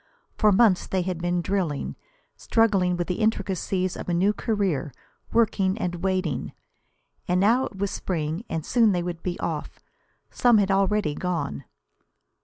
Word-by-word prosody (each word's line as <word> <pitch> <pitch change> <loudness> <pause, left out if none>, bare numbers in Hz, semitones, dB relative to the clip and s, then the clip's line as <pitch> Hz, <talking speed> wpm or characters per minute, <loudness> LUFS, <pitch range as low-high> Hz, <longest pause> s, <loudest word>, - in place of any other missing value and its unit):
For 215 - +4
months 200 -2 +4
they 185 -1 0
had 180 -2 -3
been 175 0 0
drilling, 180 -7 -2 0.4
struggling 195 -6 +2
with 175 - -1
the 180 +3 -3
intricacies 190 -3 0
of - - -6
a 175 - +1
new 195 +4 +3
career, 195 - -1 0.4
working 205 -4 +2
and 180 -5 -2
waiting. 185 -7 -1 0.7
And 180 +1 +2
now 230 +7 +3
it - - -13
was 200 0 -1
spring, 160 +1 -3
and 160 -2 -3
soon 230 -4 +3
they 175 -1 0
would 170 -1 -5
be 180 -1 -4
off. 160 -3 -4 0.5
Some 245 -3 +4
had 200 -1 +2
already 195 -4 +2
gone. 170 - -3
185 Hz, 155 wpm, -25 LUFS, 175-205 Hz, 0.7 s, For